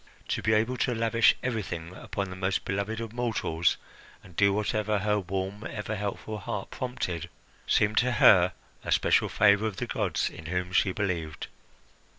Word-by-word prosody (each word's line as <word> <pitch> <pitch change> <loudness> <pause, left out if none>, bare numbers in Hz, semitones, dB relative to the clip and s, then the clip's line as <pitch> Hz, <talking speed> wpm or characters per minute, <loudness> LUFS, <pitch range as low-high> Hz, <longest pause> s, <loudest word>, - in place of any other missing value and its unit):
To - - -1
be 110 - +2
able 115 +4 +1
to 125 - 0
lavish 115 0 +4
everything 90 -8 -3
upon 100 0 -4
the - - -6
most 95 0 -1
beloved 100 +3 -2
of 115 -1 -6
mortals, 110 -9 0 0.5
and 90 - -16
do 100 +1 +4
whatever 105 +1 0
her 105 +1 +1
warm, 95 +2 -4
ever 105 0 -4
helpful 105 +1 -4
heart 105 -1 -5
prompted, 90 -10 -4 0.4
seemed 105 0 +3
to 125 0 +1
her 90 -6 +6 0.3
a - - -4
special - - +3
favour 105 +1 +4
of 105 - -5
the - - -2
gods - - -1
in 80 - -10
whom 90 +1 -2
she 95 +1 +3
believed. 85 -6 -3
100 Hz, 165 wpm, -28 LUFS, 95-110 Hz, 0.5 s, her